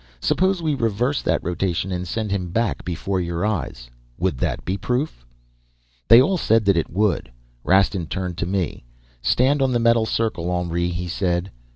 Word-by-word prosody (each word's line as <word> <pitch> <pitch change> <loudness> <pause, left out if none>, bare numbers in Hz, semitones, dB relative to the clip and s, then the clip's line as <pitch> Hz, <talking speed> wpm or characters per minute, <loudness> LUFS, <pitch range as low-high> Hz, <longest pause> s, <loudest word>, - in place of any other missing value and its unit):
'Suppose 185 - +1
we 155 -2 +1
reverse 120 +2 0
that - - 0
rotation 90 +1 -1
and 90 0 -3
send 110 +2 -3
him 90 -3 -2
back 115 +5 -1
before 90 +2 -2
your 85 +2 -2
eyes 70 - -3 0.3
would 65 - -1
that - - -2
be 95 - -1
proof?' 125 - -3 0.8
"They 115 - +9
all 180 +9 +3
said 110 -4 +2
that 100 -1 +4
it 85 - 0
would. 100 - 0 0.3
Rastin 95 -2 +2
turned 90 0 -4
to 85 - -1
me. 95 -7 -2 0.4
'Stand 130 - +2
on 130 -1 +2
the 120 - +2
metal 115 -1 +3
circle, 110 -8 -1
Henri,' 85 -1 -1
he 90 0 -4
said. 90 +1 -1
95 Hz, 175 wpm, -22 LUFS, 85-115 Hz, 0.8 s, They